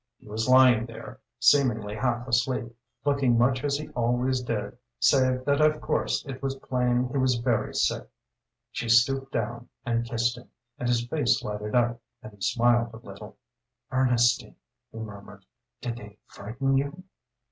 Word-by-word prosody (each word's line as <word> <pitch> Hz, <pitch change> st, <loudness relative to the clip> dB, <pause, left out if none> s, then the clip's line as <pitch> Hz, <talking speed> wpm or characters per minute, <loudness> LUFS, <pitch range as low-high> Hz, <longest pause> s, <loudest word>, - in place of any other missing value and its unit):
He -, -, -20 dB
was 110 Hz, +3 st, -2 dB
lying 125 Hz, -3 st, +6 dB
there, 115 Hz, -, -10 dB, 0.2 s
seemingly 115 Hz, -7 st, +3 dB
half 120 Hz, +2 st, -1 dB
asleep, 125 Hz, -1 st, 0 dB, 0.3 s
looking 140 Hz, -4 st, +2 dB
much 130 Hz, +2 st, +2 dB
as 140 Hz, -1 st, +1 dB
he 150 Hz, -, -7 dB
always 125 Hz, +2 st, 0 dB
did, 110 Hz, -3 st, -3 dB, 0.2 s
save 130 Hz, -2 st, +3 dB
that 140 Hz, +1 st, +2 dB
of 155 Hz, 0 st, +3 dB
course -, -, -1 dB
it 135 Hz, -2 st, -7 dB
was 135 Hz, -1 st, -2 dB
plain 125 Hz, -1 st, 0 dB
he 135 Hz, -, -1 dB
was 130 Hz, -1 st, +2 dB
very 120 Hz, -1 st, -1 dB
sick. -, -, 0 dB, 0.6 s
She 115 Hz, -, -4 dB
stooped 135 Hz, +3 st, +3 dB
down 120 Hz, +2 st, -3 dB, 0.2 s
and 115 Hz, -1 st, 0 dB
kissed 120 Hz, +1 st, -1 dB
him, 125 Hz, -, -17 dB, 0.3 s
and 125 Hz, -, -1 dB
his 120 Hz, -1 st, +1 dB
face 125 Hz, 0 st, +1 dB
lighted 105 Hz, +1 st, -4 dB
up, 120 Hz, -1 st, +1 dB, 0.2 s
and 110 Hz, -, -10 dB
he 100 Hz, -, -20 dB
smiled 120 Hz, +3 st, +2 dB
a -, -, -8 dB
little. 115 Hz, -, -11 dB, 0.5 s
"Ernestine," 125 Hz, -2 st, +2 dB, 0.4 s
he -, -, -11 dB
murmured, 100 Hz, -2 st, -10 dB, 0.4 s
"did 120 Hz, -1 st, -4 dB
they 105 Hz, -2 st, -12 dB
frighten 130 Hz, +7 st, -2 dB
you?" 145 Hz, +6 st, -5 dB
120 Hz, 160 wpm, -26 LUFS, 115-130 Hz, 0.6 s, lying